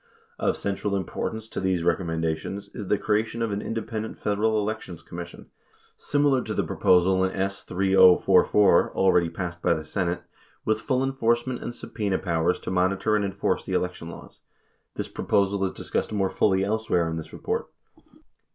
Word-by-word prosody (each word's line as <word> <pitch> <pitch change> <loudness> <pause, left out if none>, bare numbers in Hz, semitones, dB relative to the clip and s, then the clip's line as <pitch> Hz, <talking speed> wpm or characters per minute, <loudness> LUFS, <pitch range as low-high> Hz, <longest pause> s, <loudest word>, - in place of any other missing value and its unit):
Of - - +1
central 100 0 -2
im 95 -2 -1
portance 110 +5 -4
to - - -3
these 95 -3 0
recommendations 80 +3 -1
is 100 - -6
the 105 - +2
creation 110 +3 0
of 115 - -1
an 100 +1 -2
independent 110 0 -4
Federal 110 +1 +1
Elections 105 -5 -4
Commission, 85 0 -9 0.4
similar 145 -2 +2
to - - -4
the - - +1
proposal 95 +1 +3
in 95 - +1
S. 95 +1 -2
3044 95 +1 +4
already 90 -3 +3
passed 85 0 -5
by - - +3
the 80 - -6
Senate, 85 +1 -2 0.4
with 110 0 +1
full 130 +1 0
enforcement 125 -1 0
and - - -4
subpena 105 -5 -2
powers 85 0 0
to - - -4
monitor 95 +3 +1
and 105 - +1
enforce 100 0 -1
the - - -5
election 90 -2 -2
laws. - - -12 0.5
This - - -3
proposal 100 0 0
is 95 - -1
dis - - -9
cussed - - 0
more 95 -3 0
fully 95 -2 +2
elsewhere 105 -5 0
in 80 0 -3
this 80 - -7
report. - - -3
100 Hz, 170 wpm, -25 LUFS, 90-110 Hz, 0.5 s, 3044